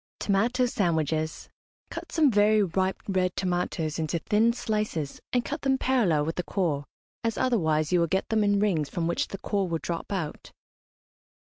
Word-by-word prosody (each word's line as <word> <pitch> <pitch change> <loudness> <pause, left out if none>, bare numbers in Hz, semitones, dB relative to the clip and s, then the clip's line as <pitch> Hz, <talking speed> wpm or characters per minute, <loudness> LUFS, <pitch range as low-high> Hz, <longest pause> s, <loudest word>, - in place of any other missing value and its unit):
TOMATO 235 +6 +2
SANDWICHES. 160 - -1 0.4
Cut - - -7
some 305 -5 +4
very 210 0 +4
ripe 190 +1 0
red 185 -2 0
tomatoes 175 -4 -1
into 160 +1 -1
thin 215 +7 +2
slices, 210 - -2
and 245 -2 +1
cut 295 +1 -4
them 270 -1 +2
parallel 205 - +2
with 165 - -3
the 180 - 0
core, 160 -7 -1 0.4
as 230 -1 -1
otherwise 160 -11 +1
you 180 - +4
will 170 - +2
get 190 +4 -1
them 220 -1 +2
in 205 -1 +3
rings 170 -9 +1
from 170 - -2
which 170 +1 0
the 195 - -6
core 200 -1 -1
will 165 - 0
drop 170 +3 -5
out. 175 -7 -4
190 Hz, 175 wpm, -27 LUFS, 165-215 Hz, 0.4 s, some